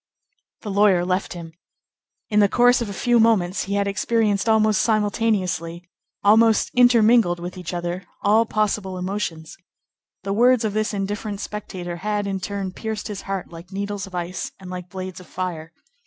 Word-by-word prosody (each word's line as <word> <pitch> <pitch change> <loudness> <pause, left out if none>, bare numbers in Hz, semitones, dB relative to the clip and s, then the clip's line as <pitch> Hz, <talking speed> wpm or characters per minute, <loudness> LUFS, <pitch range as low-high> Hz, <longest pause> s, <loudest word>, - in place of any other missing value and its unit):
The 210 - -5
lawyer 195 -3 +4
left 185 +2 -1
him. 165 -2 -9 0.8
In 210 - +3
the 205 -1 +5
course 245 +2 +4
of 230 - -3
a - - -4
few 240 +4 +2
moments 205 -5 +2
he 200 +1 -2
had 200 0 +1
experienced, 210 +1 +1
almost 215 -2 +3
simultaneously, 200 -6 0 0.4
almost 220 +2 +4
intermingled 235 -6 +5
with 175 +1 -6
each 180 -2 -6
other, 175 +1 -4 0.2
all 220 +2 +4
possible 210 -3 -1
emotions. 180 -4 -4 0.7
The 195 +1 -2
words 245 +2 +4
of 210 - -1
this 215 0 0
indifferent 205 +1 -3
spectator 180 -5 -6
had, 205 +2 -2
in 195 -1 -2
turn, 195 0 -4
pierced 220 +2 -5
his 205 -2 -5
heart 195 -3 -3
like 170 +3 -11
needles 200 0 -4
of 185 - -10
ice 175 +1 -4
and 185 -1 -9
like 180 -1 -7
blades 185 0 -6
of 180 - -14
fire. 170 -3 -5
200 Hz, 170 wpm, -22 LUFS, 180-215 Hz, 0.8 s, the